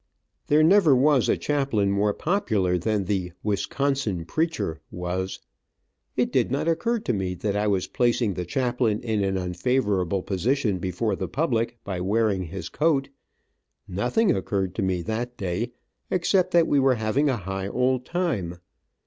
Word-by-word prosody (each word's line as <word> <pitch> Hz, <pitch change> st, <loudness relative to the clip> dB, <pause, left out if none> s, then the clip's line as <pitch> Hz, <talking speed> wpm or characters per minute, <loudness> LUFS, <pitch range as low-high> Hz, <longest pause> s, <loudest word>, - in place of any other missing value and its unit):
There 150 Hz, +1 st, +5 dB
never 170 Hz, -4 st, +6 dB
was 135 Hz, -1 st, +3 dB
a -, -, +3 dB
chaplain 135 Hz, -9 st, 0 dB
more 100 Hz, +1 st, +2 dB
popular 110 Hz, -, +1 dB
than 105 Hz, +2 st, 0 dB
the 90 Hz, -3 st, -2 dB
"Wisconsin 105 Hz, -2 st, -1 dB
preacher" 155 Hz, -, -2 dB
was. 90 Hz, +2 st, -3 dB, 0.8 s
It -, -, +1 dB
did -, -, +2 dB
not 140 Hz, +5 st, -1 dB
occur 230 Hz, +9 st, +1 dB
to 125 Hz, -, -1 dB
me 95 Hz, -3 st, -2 dB
that 100 Hz, +3 st, -2 dB
I 105 Hz, +1 st, +1 dB
was 95 Hz, -3 st, +1 dB
placing 120 Hz, -3 st, +1 dB
the 90 Hz, -, -3 dB
chaplain 120 Hz, +2 st, 0 dB
in 110 Hz, -4 st, 0 dB
an 95 Hz, -1 st, 0 dB
unfavorable 95 Hz, 0 st, 0 dB
position 105 Hz, +1 st, 0 dB
before 95 Hz, +5 st, -1 dB
the -, -, -4 dB
public, 120 Hz, -6 st, -1 dB
by 95 Hz, -3 st, -4 dB
wearing 100 Hz, -1 st, +1 dB
his 85 Hz, 0 st, -6 dB
coat. 145 Hz, -, +1 dB, 0.8 s
Nothing 125 Hz, -, +1 dB
occurred 95 Hz, -1 st, -1 dB
to 110 Hz, -, -3 dB
me, 95 Hz, -2 st, 0 dB
that 120 Hz, +4 st, -3 dB
day, 100 Hz, +6 st, -2 dB, 0.4 s
except 185 Hz, +1 st, +2 dB
that 170 Hz, -1 st, +4 dB
we 145 Hz, -, +2 dB
were 135 Hz, -1 st, +4 dB
having 115 Hz, +7 st, +1 dB
a 130 Hz, -, +1 dB
high 95 Hz, 0 st, -4 dB
old 125 Hz, +3 st, +1 dB
time. 125 Hz, -, -2 dB
110 Hz, 155 wpm, -25 LUFS, 95-135 Hz, 0.8 s, never